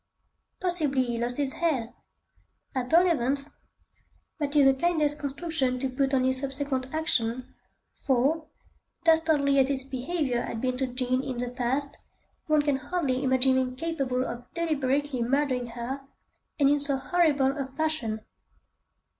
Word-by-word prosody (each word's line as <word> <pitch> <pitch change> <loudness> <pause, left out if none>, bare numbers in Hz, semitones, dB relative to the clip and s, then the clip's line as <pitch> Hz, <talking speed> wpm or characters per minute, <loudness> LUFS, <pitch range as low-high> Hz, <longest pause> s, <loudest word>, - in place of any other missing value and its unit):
Possibly 310 -8 +1
he 240 -2 -3
lost 240 +1 -2
his 280 -2 -1
head! 275 -9 -1 0.8
At 255 -2 -3
all 340 +3 +6
events, 280 -2 0 0.9
that 290 -1 -2
is 285 -2 +6
the 270 - +6
kindest 300 0 +1
construction 280 -2 -1
to 265 +1 -2
put 270 +1 +1
on 260 - +2
his 260 0 +1
subsequent 270 -1 -3
action, 255 -6 0 0.5
for, 285 +5 +1 0.6
dastardly 315 -4 +4
as 265 0 +4
his 270 -2 0
behaviour 265 -1 -2
had 230 - -4
been 255 +1 -1
to 265 0 0
Jean 255 0 -1
in 265 -2 -4
the 245 0 -2
past, 265 +4 -2 0.5
one 305 -1 +3
can 290 -2 +1
hardly 275 -4 -1
imagine 260 0 +3
him 255 -1 -2
capable 265 -4 -1
of 240 +1 -7
deliberately 290 -5 0
murdering 255 0 +1
her, 240 +4 -5 0.6
and 280 - +5
in 290 +1 +3
so 280 -1 +1
horrible 285 -3 +2
a 275 -3 -3
fashion. 270 -6 -2
270 Hz, 145 wpm, -27 LUFS, 255-295 Hz, 0.9 s, all